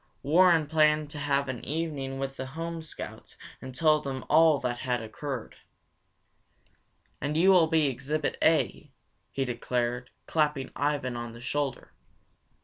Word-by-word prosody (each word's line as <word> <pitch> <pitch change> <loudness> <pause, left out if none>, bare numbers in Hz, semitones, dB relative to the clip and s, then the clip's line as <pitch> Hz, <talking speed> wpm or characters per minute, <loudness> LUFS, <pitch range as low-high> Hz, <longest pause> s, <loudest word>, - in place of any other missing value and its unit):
Warren 165 +1 +5
planned 150 -1 +2
to 150 - -6
have 140 -1 0
an 130 -2 -5
evening 145 -4 -3
with 135 0 -4
the 130 0 -5
home 165 +4 -5
Scouts 160 - -9 0.2
and 130 -1 -8
tell 155 +1 +4
them 135 -2 -5
all 160 0 +6
that 125 -2 -3
had 125 -1 -1
occurred. 120 +3 -6 1.6
"And 145 +2 -1
you 185 +4 +6
will 175 -4 +6
be 160 -1 +3
Exhibit 140 +3 -1
A," 155 -1 +2 0.4
he 135 - -1
declared, 125 0 -2 0.2
clapping 150 -4 0
Ivan 145 -3 -1
on 120 -1 -5
the 115 - -11
shoulder. 135 +2 -3
145 Hz, 140 wpm, -28 LUFS, 130-155 Hz, 1.6 s, all